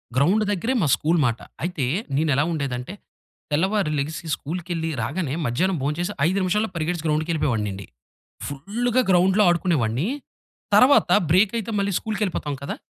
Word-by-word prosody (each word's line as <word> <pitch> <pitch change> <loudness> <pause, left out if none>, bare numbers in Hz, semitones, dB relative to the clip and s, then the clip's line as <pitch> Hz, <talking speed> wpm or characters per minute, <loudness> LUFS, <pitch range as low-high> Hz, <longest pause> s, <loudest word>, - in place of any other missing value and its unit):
Ground 180 +11 +3
దగ్గరే 225 +6 -1
మా 155 - +2
school 165 +2 +1
మాట. 120 -1 0 0.2
అయితే 170 -6 -1 0.3
నేను 155 +3 +1
ఎలా 145 - +3
ఉండేది 140 -6 -2
అంటే, 125 +10 -7 0.6
తెల్లవారి 185 +2 +1
లేగిసి 155 +4 -3
స్కూలుకెళ్లి 165 +1 -4
రాగానే 140 +5 -2
మధ్యాహ్నం 175 +10 0
భోంచేసి 175 +7 -2
5 190 +3 0
నిమిషాల్లో 210 +4 0
పరిగెట్టేసి 165 0 -2
గ్రౌండ్‌కెళ్ళిపోయెవాడినండి. 150 - -1 0.6
ఫుల్‌గా 220 - -1
గ్రౌండ్‌లో 185 +4 +4
ఆడుకునేవాడిని. 160 - +1 0.7
తర్వాత 265 +3 +5 0.2
బ్రేకయితే 210 +5 +2
మళ్ళీ 200 0 0
స్కూలుకెళ్ళిపోతాం 205 -9 -3
కదా! 140 - -4
170 Hz, 130 wpm, -23 LUFS, 145-195 Hz, 0.7 s, తర్వాత